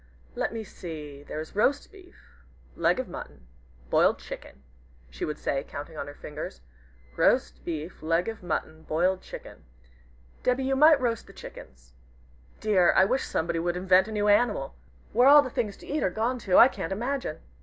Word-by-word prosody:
"Let - - -2
me 225 -1 -5
see 150 -7 -8
there 145 - -6
is 155 +4 -8
roast 280 +7 +1
beef 375 -3 -16 0.6
leg - - +2
of - - -3
mutton 70 -4 -9 0.5
boiled - - +4
chicken," 65 0 -10 0.5
she - - -4
would 150 - -4
say, 135 - -1
counting 150 +2 -8
on - - -5
her 145 - -9
fingers, 150 - -7 0.5
"roast - - +2
beef 160 0 -5
leg 165 +3 +1
of 225 -1 -5
mutton 160 -3 -3
boiled 180 +4 0
chicken. - - -11 0.8
Debby, 250 +1 +1
you 270 +1 +1
might 305 +2 +7
roast 235 -4 -1
the - - -14
chickens. 65 -1 -12 0.7
Dear! 195 -5 +4
I - - +6
wish 260 +7 0
somebody 165 +1 -1
would 175 +1 -1
invent 185 +1 +4
a - - -7
new 210 -1 0
animal! 205 - +2 0.4
Where 245 +4 +5
all 290 +1 +9
the 255 - -6
things 210 -4 -2
to - - -14
eat 300 +1 -1
are - - +2
gone 230 +6 -1
to, 190 -5 +2
I 240 - +10
can't 195 -10 -5
imagine!" 240 - -2
185 Hz, 180 wpm, -27 LUFS, 155-240 Hz, 0.8 s, I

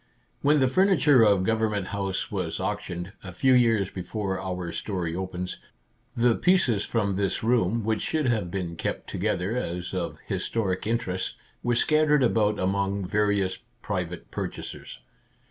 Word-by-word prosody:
When 150 +1 +4
the 130 - +4
furniture 150 -5 +4
of 100 -4 +5
Gov 110 +3 +1
ernment 105 -3 0
House 100 -1 -2
was 90 -5 -2
auctioned, 95 -2 -4
a 95 - -6
few 130 +10 +3
years 115 -6 +3
be 95 - -5
fore 95 +1 -3
our 90 -2 -4
story 90 -5 -3
opens, 90 -1 -4 0.6
the 120 -1 +4
pieces 130 - +3
from 105 -4 0
this 100 +1 0
room, 115 -2 +2
which 110 0 0
should 155 -2 0
have 110 -8 +1
been 90 -2 -3
kept - - -3
together 95 +6 -1
as 90 -7 -3
of - - -3
historic 100 -3 -2
interest, 110 -5 -1 0.3
were 120 0 +1
scattered 150 +2 +3
about 105 -3 +2
among 100 +1 0
various 100 -1 +1 0.2
private 90 - -4
purchasers. - - -6
100 Hz, 150 wpm, -26 LUFS, 95-115 Hz, 0.6 s, of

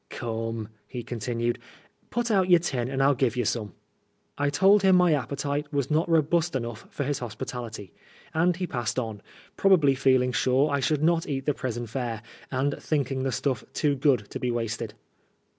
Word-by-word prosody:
" - - -46
Come," 115 -2 -4 0.2
he 120 -2 -6
continued, 120 0 -2 0.3
" - - -36
put 240 0 -1
out 190 -3 +3
your 175 - +8
tin 125 -7 -2
and 135 0 0
FU 140 +1 +5
give 125 -2 0
you 120 - +1
some.'* 105 -3 -2 0.6
I 145 0 +1
told 195 +8 +5
him 190 -1 +5
my 180 -2 +5
appetite 145 +1 -2
was 140 0 -1
not 160 +3 +2
robust 165 0 +2
enough 115 -3 -4
for 145 - -3
his 145 0 -1
hospitality, 115 -4 -6 0.4
and 170 +2 +3
he 185 +1 -2
passed 120 -8 -3
on, 110 -5 -3 0.4
probably 175 -8 +5
feeling 130 -1 +3
sure 130 +3 +2
I 140 - +1
should 150 +2 +1
not 165 0 +2
eat 135 -2 -3
the 150 - +2
prison 120 -3 -4
fare, 115 -2 -4 0.3
and 140 +2 -1
thinking 135 -3 -1
the 135 0 0
stuff 130 0 -1
too 150 -2 +1
good 130 -6 +2
to - - -4
be 125 - -1
wasted. 115 -2 -3
135 Hz, 190 wpm, -26 LUFS, 120-150 Hz, 0.6 s, your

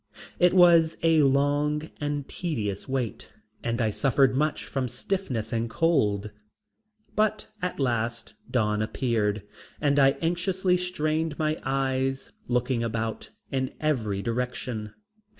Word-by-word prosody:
It 180 +1 +5
was 170 -3 +6
a 165 -1 +5
long 145 +2 +2
and 145 -1 -2
tedious 110 - -3
wait 125 -6 -3 0.3
and 115 0 -1
I 110 -3 +2
suffered 135 +2 +3
much 150 +3 0
from 130 -2 -2
stiffness 125 - -3
and 115 0 -1
cold, 105 -10 +1 0.8
but 215 0 0
at 180 -3 -3
last 115 -3 -1 0.2
dawn 105 -3 +1
appeared 110 -3 0 0.4
and 145 -1 +2
I 135 0 +6
anxiously 180 +2 +1
strained 160 -3 -1
my 155 0 0
eyes, 135 0 -1 0.2
looking 125 0 0
about 115 -1 -3 0.2
in 130 -1 -2
every 110 -10 0
direction. 120 -2 -3
135 Hz, 120 wpm, -27 LUFS, 115-155 Hz, 0.8 s, was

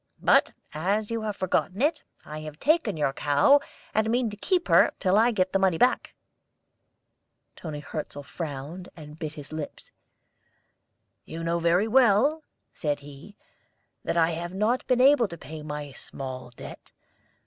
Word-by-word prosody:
But - - +4 0.2
as 200 +8 -1
you 230 -1 -1
have 215 -2 -3
forgotten 185 +1 -1
it, 300 +4 +1 0.2
I 155 0 -7
have 155 -1 -8
taken 290 - +1
your 140 -3 0
cow, 145 - +4 0.3
and 220 +1 +1
mean 235 -1 +1
to - - -7
keep 360 - 0
her - - +5
till 185 -1 +2
I 225 +3 +5
get 185 -5 0
the 195 - +3
money 190 -3 +2
back." 250 +8 +1 1.4
Toni 150 -3 -7
Hirzel 145 -1 -6
frowned 155 +4 -7
and 150 0 -11
bit 155 -1 -4
his 145 0 -10
lips. 155 -2 -7 1.3
"You 165 +1 -7
know 170 +1 0
very 170 +5 +2
well," 260 +5 +4 0.3
said 145 -2 -2
he, 145 +8 -13 0.7
"that - - -1
I 165 0 +4
have 175 +2 -5
not 220 +6 0
been 250 -1 +3
able 270 -3 +5
to 170 - -9
pay 155 0 -9
my 150 -1 -6
small 130 -1 -8
debt. 120 - -11
175 Hz, 160 wpm, -26 LUFS, 150-220 Hz, 1.4 s, her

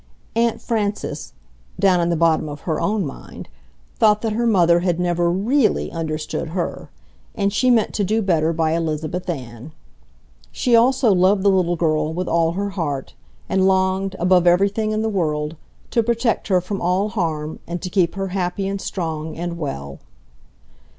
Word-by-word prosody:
Aunt 230 0 +1
Frances 205 - -3 0.5
(down 185 -2 +4
in 170 - +1
the 170 - +1
bottom 160 -1 +2
of 145 -1 -8
her 160 -3 -2
own 205 -3 0
mind) 135 - -9 0.5
thought 215 -2 +4
that 220 -2 0
her 235 +2 0
mother 175 -5 +4
had 175 -1 0
never 175 -1 +1
REALLY 220 +8 +1
understood 155 -1 -3
her, 175 - -3 0.5
and 200 0 0
she 255 +4 +2
meant 235 -3 +3
to 205 - 0
do 215 +3 0
better 165 -4 +2
by 160 -1 0
Elizabeth 165 +2 -2
Ann. 125 -2 -6 0.8
She 245 -2 +2
also 245 -1 +4
loved 190 +2 +3
the 200 - +5
little 180 -2 +2
girl 155 -1 0
with 180 0 -2
all 165 0 +2
her 200 +2 -2
heart, 145 -8 -3 0.3
and 190 0 +2
longed, 190 0 +1
above 180 0 +3
everything 200 +5 +3
in 215 0 -1
the - - 0
world, 155 -6 -1 0.4
to 235 - +3
protect 230 0 0
her 185 -3 +3
from 195 +2 -5
all 185 +4 +1
harm 160 -7 -3
and 175 +1 -4
to 185 - -3
keep 180 -2 +1
her 195 -1 -3
happy 185 +1 -2
and 195 0 -3
strong 160 -3 -4
and 170 0 -3
well. 70 - -5
180 Hz, 170 wpm, -21 LUFS, 165-205 Hz, 0.8 s, the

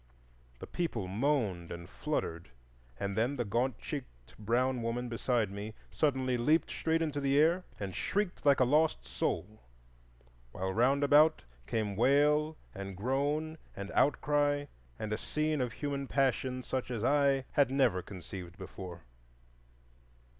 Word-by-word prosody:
The - - -8
people 120 - -2
moaned 105 - 0
and 85 0 -7
fluttered, 80 +7 -3 0.5
and 100 -1 -2
then 120 +6 +1
the 120 -3 -1
gaunt 120 +3 0
cheeked 95 - -8
brown 120 +4 +1
woman 120 +2 -2
beside 115 -3 0
me 105 +2 -6 0.2
suddenly 130 -4 +1
leaped 150 +8 +2
straight 165 0 +1
into 145 -2 -2
the 140 0 +2
air 170 +5 +4
and 95 -2 -4
shrieked 200 -2 -1
like 140 -1 +5
a - - +6
lost 150 +5 +2
soul, 110 +3 -3 0.9
while 95 +1 -2
round 135 +6 +3
about 150 +2 +5 0.2
came 105 -3 -1
wail 150 +6 +3 0.2
and 100 -1 -6
groan 145 +7 -1 0.2
and 100 0 -6
outcry, 145 0 +2 0.3
and 110 +7 -3
a 110 - -2
scene 155 -1 -1
of 125 -2 -1
human 140 +1 -3
passion 130 -1 0
such 130 0 -3
as 115 -3 -3
I 140 -1 +3
had 140 -3 +3
never 130 -9 +2
conceived 90 0 -9
before. 90 -3 -8
130 Hz, 140 wpm, -32 LUFS, 105-145 Hz, 0.9 s, a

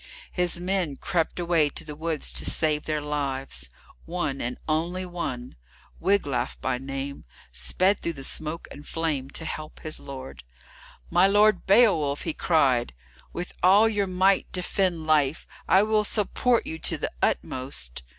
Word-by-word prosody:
His 180 -1 +1
men 180 -5 -1
crept 175 +1 -1
away 170 -4 +2
to - - -3
the 150 -1 -7
woods 160 -1 -3
to - - 0
save 150 -2 +2
their 155 -1 -1
lives. 135 - -1 0.4
One, 160 -5 -2
and 125 +1 -3
one 160 +3 0
only, 170 -9 -5 0.5
Wiglaf 180 -8 0
by 125 -1 -1
name, 135 +1 -5 0.3
sped 180 - +2
through 170 - -2
the 135 -3 -8
smoke 155 +4 -1
and 145 - -11
flame 155 -5 -2
to 160 - -4
help 155 -1 -6
his 155 -1 -3
lord. 135 -1 -9 0.7
"My 175 +3 +5
Lord 210 +1 +4
Beowulf!" 180 -10 +4
he 165 - -2
cried, 130 - +2 0.4
"with 175 +1 -6
all 200 +5 +6
your 205 -3 0
might 190 +1 +2
defend 180 -2 0
life, 155 -1 +2 0.2
I 190 +2 +5
will 215 0 +2
support 230 +3 +1
you 160 - -6
to - - +1
the - - -3
utmost." 65 - -2
160 Hz, 150 wpm, -26 LUFS, 140-185 Hz, 0.7 s, all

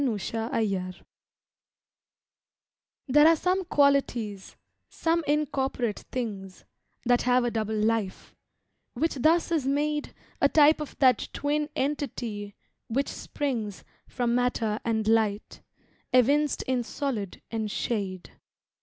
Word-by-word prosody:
SONNET 230 -6 0
SILENCE 200 -4 -2 2.0
There 295 +3 +6
are 330 - +6
some 370 +4 0
qualities 260 - +1 0.3
some 330 0 0
incorporate 270 -6 0
things, 200 -7 -5 0.4
That 245 0 +3
have 250 0 +3
a 240 - 0
double 220 -1 -2
life, 215 -2 -1 0.6
which 320 +7 0
thus 330 +4 +3
is 305 -6 +1
made 295 +2 -1 0.3
A - - +5
type 305 0 +5
of 300 - -7
that 260 -2 +3
twin 295 +1 -1
entity 240 -8 -3 0.3
which 270 +5 -1
springs 230 -9 -4 0.2
From 240 -1 -1
matter 240 -3 0
and 220 -2 -1
light, 220 -2 +1 0.5
evinced 280 +4 +3
in 260 -1 0
solid 235 -6 -4
and 220 -2 -2
shade. 195 -4 -3
245 Hz, 110 wpm, -27 LUFS, 215-290 Hz, 2.0 s, There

